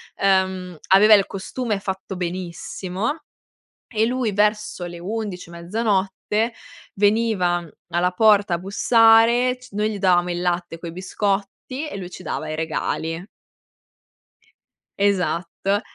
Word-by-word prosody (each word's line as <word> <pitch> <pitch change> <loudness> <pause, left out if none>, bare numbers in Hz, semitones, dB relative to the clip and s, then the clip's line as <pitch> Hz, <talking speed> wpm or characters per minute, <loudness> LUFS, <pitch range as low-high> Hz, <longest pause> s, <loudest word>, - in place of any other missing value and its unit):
Ehm, 190 -2 +1
aveva 205 +3 +7
il 200 -2 +6
costume 210 +2 -3
fatto 190 0 -5
benissimo 185 - -4 0.7
e 220 -2 +1
lui, 245 -3 0
verso 210 -2 0
le 175 0 -8
11, 195 -2 -5
mezzanotte, 200 +4 -1 0.4
veniva 200 -4 +2 0.2
alla 175 +1 +1
porta 205 -2 +4
a - - -1
bussare 225 +5 +4
c 250 0 -15
noi 210 +1 0
gli 210 - -4
davamo 180 -2 +3
il 175 - -2
latte 175 -1 -2
coi 165 0 -7
biscotti 200 - -3
e 290 - -6
lui 180 -2 -7
ci 185 - -10
dava 155 -2 -4
i - - -3
regali. 160 +1 -2 1.7
Esatto. 195 0 0
195 Hz, 120 wpm, -22 LUFS, 180-215 Hz, 1.7 s, aveva